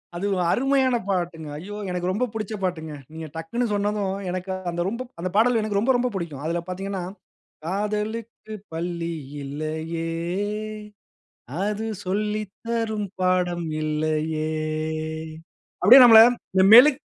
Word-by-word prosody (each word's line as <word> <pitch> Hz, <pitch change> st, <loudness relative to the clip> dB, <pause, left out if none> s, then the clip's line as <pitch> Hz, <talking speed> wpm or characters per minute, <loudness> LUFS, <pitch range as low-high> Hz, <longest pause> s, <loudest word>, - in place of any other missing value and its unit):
அது 185 Hz, +4 st, -3 dB
ஒரு 180 Hz, -1 st, 0 dB
அருமயான 265 Hz, -1 st, +2 dB
பாட்டுங்க. 175 Hz, -4 st, -2 dB
ஐயோ! 205 Hz, +6 st, -7 dB
எனக்கு 180 Hz, 0 st, -2 dB
ரொம்ப 235 Hz, +6 st, 0 dB
புடிச்ச 215 Hz, -1 st, -4 dB
பாட்டுங்க. 160 Hz, -4 st, -3 dB, 0.2 s
நீங்க 160 Hz, 0 st, -6 dB
டக்ன்னு 235 Hz, +10 st, -2 dB
சொன்னதும், 205 Hz, -1 st, -1 dB
எனக்கு 185 Hz, +1 st, -4 dB, 0.2 s
அந்த 175 Hz, 0 st, -3 dB
ரொம்ப 235 Hz, +4 st, -5 dB, 0.2 s
அந்த 185 Hz, -, -2 dB
பாடல் 235 Hz, +1 st, +4 dB
எனக்கு 205 Hz, -2 st, 0 dB
ரொம்ப 255 Hz, +5 st, +2 dB
ரொம்ப 250 Hz, +1 st, 0 dB
புடிக்கும். 155 Hz, -6 st, -5 dB
அதுல 170 Hz, +1 st, -1 dB
பாத்தீங்கன்னா, 190 Hz, 0 st, -4 dB, 0.6 s
"காதலுக்கு 210 Hz, +3 st, -3 dB, 0.2 s
பள்ளி 170 Hz, 0 st, -3 dB, 0.3 s
இல்லயே, 160 Hz, +3 st, -4 dB, 1.6 s
அது 210 Hz, +1 st, -2 dB, 0.2 s
சொல்லி 210 Hz, +3 st, -1 dB, 0.3 s
தரும் 220 Hz, -3 st, -1 dB
பாடம் 180 Hz, -2 st, +1 dB, 0.2 s
இல்லயே" 155 Hz, 0 st, -1 dB, 1.3 s
அப்டியே 255 Hz, +4 st, +10 dB
நம்மள 225 Hz, -2 st, +10 dB, 0.3 s
இந்த 190 Hz, -, +5 dB
மெழுக் 270 Hz, +3 st, +8 dB
190 Hz, 120 wpm, -24 LUFS, 170-220 Hz, 1.6 s, அப்டியே